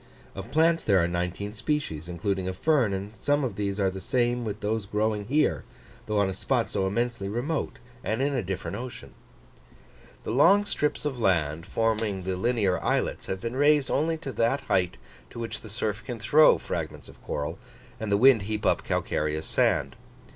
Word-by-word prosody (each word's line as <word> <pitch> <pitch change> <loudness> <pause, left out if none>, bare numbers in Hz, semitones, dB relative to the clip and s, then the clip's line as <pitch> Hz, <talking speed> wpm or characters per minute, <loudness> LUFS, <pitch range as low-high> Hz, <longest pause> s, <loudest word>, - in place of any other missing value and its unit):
Of 95 +3 -7
plants 165 +4 +3
there 100 -3 +4
are 85 -2 +3
nineteen 90 +4 -3
species, 105 - -2
including 95 +2 -2
a - - -3
fern; 130 0 +2
and 100 +3 -4
some 145 +4 +1
of 130 - -2
these 100 0 -2
are 95 -1 +2
the 95 0 -7
same 120 +3 0
with 105 -2 -4
those 105 -1 -1
growing 105 0 0
here, 145 +7 +1 0.4
though 105 0 0
on 100 -1 +3
a 95 - -2
spot 120 +4 0
so 95 -2 0
immensely 115 -1 -1
remote, 130 +4 -2 0.3
and 110 - -1
in 140 +2 +1
a 130 - 0
different 95 -1 -4
ocean. 125 0 -8 1.1
The - - -3
long 185 - +5
strips 150 -6 -1
of 135 -4 -2
land, 85 -5 +1
forming 110 -4 0
the 95 0 -2
linear 100 -2 +1
islets, - - -1
have 95 - -3
been 115 +1 -4
raised 145 0 +3
only 160 +3 +1
to 155 -4 -6
that 115 +4 +1
height 90 -7 0 0.3
to - - -12
which 115 -1 -5
the 110 - -10
surf 105 0 -2
can 120 +2 -5
throw 150 +8 +6
fragments - - -5
of - - -16
coral, 75 +6 -4 0.4
and 110 -2 -3
the 100 - +4
wind 125 0 +6
heap 105 +1 -3
up - - +2
calcareous 75 +1 -1
sand. - - +1
110 Hz, 190 wpm, -27 LUFS, 95-130 Hz, 1.1 s, throw